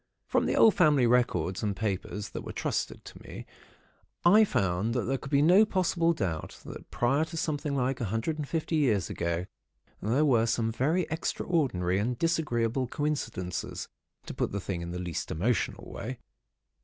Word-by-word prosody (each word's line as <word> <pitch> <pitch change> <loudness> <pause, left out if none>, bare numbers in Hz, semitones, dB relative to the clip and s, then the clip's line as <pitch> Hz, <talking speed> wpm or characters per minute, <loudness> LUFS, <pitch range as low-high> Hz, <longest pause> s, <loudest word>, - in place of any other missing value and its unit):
"From - - +1
the - - +1
old 225 - +7
family 150 -7 +4
records 105 -8 +1
and 105 -2 -1
papers 100 0 -3
that - - -5
were - - -7
trusted - - -3
to - - -11
me, - - -9 0.8
I 210 +5 +7
found 100 - 0
that 125 - +1
there 135 +1 -1
could 135 - -8
be 140 0 +3
no 180 +7 +7
possible 180 -5 +1
doubt 90 - -3
that - - -9
prior 135 +6 +1
to 165 +1 -8
something 150 -2 -1
like 130 -1 0
a - - 0
hundred 115 +10 -2
and 145 - -3
fifty 160 +1 -1
years 110 - +1
ago 85 +1 -2 0.6
there 125 +9 +2
were 120 -5 +3
some 115 -1 0
very 155 +10 +1
extraordinary 135 - 0
and 120 +4 -1
disagreeable 130 -7 0
coincidences, 115 -11 -3 0.4
to - - -6
put - - -1
the 100 - -2
thing 95 -2 -4
in 85 - -5
the 90 - -4
least 90 -2 -4
emotional 110 +9 -1
way. - - -5
125 Hz, 175 wpm, -29 LUFS, 100-155 Hz, 0.8 s, old